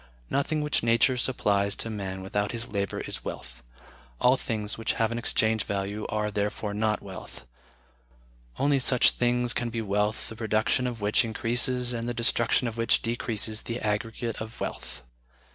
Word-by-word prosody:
Nothing 150 Hz, +2 st, +1 dB
which 150 Hz, -1 st, +1 dB
Nature 115 Hz, +3 st, +4 dB
supplies 100 Hz, -6 st, +1 dB
to -, -, -3 dB
man 95 Hz, -3 st, -4 dB
without 100 Hz, +2 st, -1 dB
his 115 Hz, 0 st, -3 dB
labor 100 Hz, -2 st, -2 dB
is -, -, -5 dB
wealth.... -, -, -7 dB, 0.6 s
All 125 Hz, +1 st, +5 dB
things 110 Hz, -5 st, -2 dB
which 115 Hz, 0 st, -1 dB
have 115 Hz, 0 st, +1 dB
an 115 Hz, -, -2 dB
exchange 110 Hz, -2 st, +1 dB
value 100 Hz, +1 st, -2 dB
are, 105 Hz, 0 st, -1 dB
therefore, 105 Hz, 0 st, -2 dB
not 105 Hz, 0 st, 0 dB
wealth. 95 Hz, -9 st, -9 dB, 1.1 s
Only 140 Hz, 0 st, +3 dB
such 125 Hz, -1 st, +5 dB
things 120 Hz, 0 st, +1 dB
can 120 Hz, -1 st, -1 dB
be 115 Hz, 0 st, -3 dB
wealth 105 Hz, +1 st, 0 dB
the 110 Hz, -, -8 dB
production 110 Hz, +3 st, +1 dB
of 120 Hz, -3 st, -5 dB
which 105 Hz, +1 st, +3 dB
increases 120 Hz, +2 st, -1 dB
and 115 Hz, 0 st, -2 dB
the 120 Hz, -, -3 dB
destruction 115 Hz, +1 st, +2 dB
of 115 Hz, 0 st, -5 dB
which 115 Hz, -, +3 dB
decreases 110 Hz, -2 st, 0 dB
the 115 Hz, +1 st, -4 dB
aggregate 115 Hz, +2 st, -2 dB
of 110 Hz, +1 st, -7 dB
wealth.... -, -, -5 dB
110 Hz, 165 wpm, -28 LUFS, 105-120 Hz, 1.1 s, All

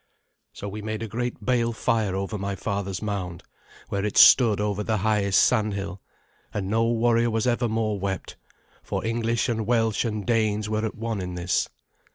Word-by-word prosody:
So 100 Hz, -, -7 dB
we 105 Hz, +2 st, -6 dB
made 110 Hz, +1 st, -4 dB
a -, -, -3 dB
great 120 Hz, +3 st, -4 dB
bale 120 Hz, -2 st, +1 dB
fire 110 Hz, -3 st, 0 dB
over 95 Hz, +2 st, -3 dB
my 100 Hz, 0 st, -3 dB
father's 100 Hz, 0 st, -3 dB
mound, 95 Hz, -5 st, -4 dB, 0.5 s
where 100 Hz, 0 st, -1 dB
it 105 Hz, -, -2 dB
stood 115 Hz, -6 st, +7 dB
over 105 Hz, -1 st, -1 dB
the 110 Hz, +1 st, 0 dB
highest 100 Hz, -3 st, +3 dB
sandhill; 100 Hz, -4 st, 0 dB, 0.5 s
and 100 Hz, -2 st, -3 dB
no 115 Hz, +1 st, +2 dB
warrior 115 Hz, 0 st, +2 dB
was 115 Hz, 0 st, 0 dB
ever 120 Hz, -1 st, +1 dB
more 110 Hz, -2 st, -1 dB
wept, 95 Hz, -2 st, -4 dB, 0.5 s
for -, -, -4 dB
English 115 Hz, +1 st, 0 dB
and 110 Hz, -3 st, -2 dB
Welsh 115 Hz, -3 st, +2 dB
and 110 Hz, -3 st, -3 dB
Danes 110 Hz, -3 st, +1 dB
were 110 Hz, 0 st, -1 dB
at -, -, -7 dB
one 115 Hz, -2 st, -3 dB
in 90 Hz, -1 st, -5 dB
this. 90 Hz, 0 st, 0 dB
110 Hz, 180 wpm, -25 LUFS, 100-115 Hz, 0.5 s, stood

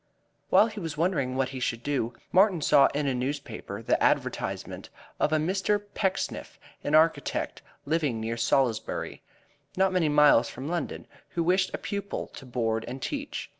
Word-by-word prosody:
While 195 Hz, +3 st, +6 dB
he 220 Hz, -2 st, -6 dB
was 165 Hz, -5 st, -5 dB
wondering 150 Hz, -7 st, 0 dB
what 130 Hz, -1 st, 0 dB
he 130 Hz, -1 st, -6 dB
should 115 Hz, -1 st, -2 dB
do, 135 Hz, -5 st, -1 dB, 0.2 s
Martin 190 Hz, -1 st, +4 dB
saw 140 Hz, -, +6 dB
in 145 Hz, 0 st, -2 dB
a 135 Hz, -, +1 dB
newspaper 130 Hz, +4 st, -4 dB
the -, -, +1 dB
advertisement -, -, -1 dB, 0.3 s
of 150 Hz, -, +2 dB
a 155 Hz, -, +3 dB
Mr. 190 Hz, +6 st, +1 dB
Pecksniff, 190 Hz, -2 st, -2 dB, 0.2 s
an 150 Hz, -, +1 dB
architect, 155 Hz, -3 st, +2 dB, 0.2 s
living 145 Hz, -6 st, 0 dB
near 115 Hz, +1 st, -2 dB
Salisbury, 115 Hz, -1 st, 0 dB, 0.6 s
not 190 Hz, 0 st, +3 dB
many 170 Hz, -4 st, +2 dB
miles 150 Hz, -5 st, +5 dB
from 130 Hz, +3 st, -7 dB
London, 175 Hz, +1 st, -3 dB, 0.3 s
who 170 Hz, -, +1 dB
wished 185 Hz, +2 st, +2 dB
a -, -, -3 dB
pupil 200 Hz, -2 st, -4 dB
to 135 Hz, -, -11 dB
board 115 Hz, -2 st, -1 dB
and 130 Hz, +3 st, -6 dB
teach. 290 Hz, -, -4 dB
150 Hz, 165 wpm, -27 LUFS, 130-185 Hz, 0.6 s, While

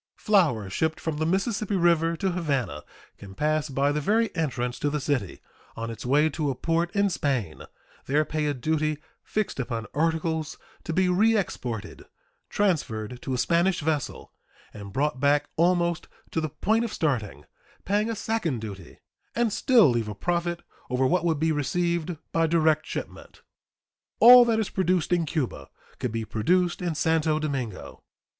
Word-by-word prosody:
Flour 165 Hz, -, +2 dB
shipped 160 Hz, +12 st, -1 dB
from 160 Hz, -2 st, -3 dB
the 155 Hz, +1 st, 0 dB
Mississippi 200 Hz, +3 st, 0 dB
River 170 Hz, -2 st, +2 dB
to 190 Hz, +1 st, 0 dB
Havana 140 Hz, -, -2 dB, 0.4 s
can 95 Hz, -1 st, -11 dB
pass 155 Hz, +3 st, 0 dB
by 140 Hz, +1 st, +1 dB
the 150 Hz, +1 st, -1 dB
very 220 Hz, +6 st, +1 dB
entrance 125 Hz, -6 st, -2 dB
to 145 Hz, -, 0 dB
the 150 Hz, +1 st, -2 dB
city 130 Hz, -, -2 dB, 0.3 s
on 115 Hz, +1 st, -4 dB
its 115 Hz, -, -8 dB
way 145 Hz, +5 st, +3 dB
to 155 Hz, -1 st, -2 dB
a 135 Hz, -, -2 dB
port 165 Hz, +5 st, 0 dB
in 200 Hz, 0 st, +3 dB
Spain, 135 Hz, -, -2 dB, 0.5 s
there 150 Hz, +3 st, +2 dB
pay 150 Hz, 0 st, -2 dB
a 145 Hz, -, -1 dB
duty 155 Hz, +3 st, -1 dB, 0.2 s
fixed 215 Hz, -8 st, -3 dB
upon 115 Hz, -3 st, -3 dB
articles 160 Hz, 0 st, -1 dB, 0.3 s
to -, -, -3 dB
be 185 Hz, +3 st, +2 dB
reexported, 180 Hz, -, 0 dB, 0.4 s
transferred 125 Hz, -, -1 dB
to 130 Hz, -, -3 dB
a -, -, -2 dB
Spanish 170 Hz, +6 st, +2 dB
vessel 150 Hz, -2 st, -3 dB, 0.4 s
and 100 Hz, -1 st, -9 dB
brought 135 Hz, +3 st, -1 dB
back 145 Hz, +1 st, +2 dB
almost 170 Hz, 0 st, +1 dB, 0.2 s
to 160 Hz, -, -1 dB
the 155 Hz, -, -2 dB
point 220 Hz, +10 st, 0 dB
of 230 Hz, -, -3 dB
starting, 110 Hz, -, -2 dB, 0.4 s
paying 205 Hz, +3 st, +1 dB
a 230 Hz, -, -2 dB
second 205 Hz, -, -2 dB
duty, 100 Hz, -5 st, -9 dB, 0.3 s
and 235 Hz, -3 st, +1 dB
still 235 Hz, -, +5 dB
leave 120 Hz, -4 st, 0 dB
a 105 Hz, -, -5 dB
profit 175 Hz, -, -2 dB, 0.3 s
over 125 Hz, +1 st, +1 dB
what 180 Hz, +7 st, +2 dB
would 160 Hz, -3 st, +1 dB
be 160 Hz, +1 st, +2 dB
received 170 Hz, +3 st, -1 dB
by 165 Hz, 0 st, +2 dB
direct 155 Hz, -1 st, +2 dB
shipment. -, -, -7 dB, 0.8 s
All 245 Hz, +1 st, +10 dB
that 225 Hz, -2 st, +1 dB
is 220 Hz, -, -2 dB
produced 180 Hz, -2 st, +1 dB
in 170 Hz, -2 st, +1 dB
Cuba 130 Hz, -, -3 dB, 0.3 s
could 125 Hz, -, -2 dB
be 115 Hz, 0 st, -3 dB
produced 175 Hz, +13 st, +1 dB
in 175 Hz, -3 st, -2 dB
Santo 160 Hz, 0 st, +1 dB
Domingo. 135 Hz, -9 st, -4 dB
155 Hz, 165 wpm, -26 LUFS, 130-175 Hz, 0.8 s, All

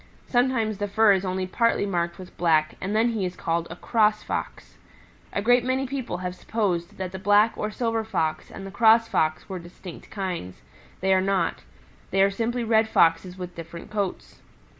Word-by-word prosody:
Sometimes 240 Hz, -4 st, +1 dB
the 205 Hz, -, -1 dB
fur 215 Hz, +1 st, +4 dB
is 190 Hz, -1 st, +2 dB
only 185 Hz, 0 st, -2 dB
partly 230 Hz, +2 st, +1 dB
marked 170 Hz, -3 st, -1 dB
with 185 Hz, -1 st, -11 dB
black 155 Hz, -3 st, +2 dB
and 200 Hz, +3 st, -2 dB
then 225 Hz, +2 st, +3 dB
he 220 Hz, -4 st, -2 dB
is 180 Hz, -1 st, -3 dB
called 165 Hz, 0 st, -1 dB
a 165 Hz, -, -7 dB
Cross 215 Hz, +2 st, +2 dB
Fox. -, -, -5 dB, 0.5 s
A 200 Hz, -, -2 dB
great 245 Hz, +2 st, +4 dB
many 260 Hz, +2 st, 0 dB
people 260 Hz, -8 st, -4 dB
have 180 Hz, 0 st, -4 dB
supposed 185 Hz, -2 st, -2 dB
that 185 Hz, -1 st, -4 dB
the 190 Hz, -, -6 dB
Black 205 Hz, +3 st, +4 dB
or 210 Hz, -, -2 dB
Silver 225 Hz, 0 st, -1 dB
Fox 160 Hz, -8 st, -2 dB
and 195 Hz, -, -9 dB
the 195 Hz, -, -7 dB
Cross 225 Hz, +1 st, +5 dB
Fox 155 Hz, 0 st, 0 dB
were 190 Hz, -3 st, -5 dB
distinct 175 Hz, 0 st, -11 dB
kinds. 180 Hz, -, -5 dB, 0.4 s
They 190 Hz, +1 st, +3 dB
are 190 Hz, -, +4 dB
not. 195 Hz, 0 st, 0 dB, 0.5 s
They 195 Hz, +1 st, +3 dB
are 200 Hz, -, +3 dB
simply 235 Hz, +4 st, -1 dB
Red 220 Hz, -1 st, +3 dB
Foxes 170 Hz, +1 st, +3 dB
with 180 Hz, -1 st, -6 dB
different 170 Hz, +3 st, -9 dB
coats. 205 Hz, -3 st, -4 dB
195 Hz, 190 wpm, -25 LUFS, 180-225 Hz, 0.5 s, Cross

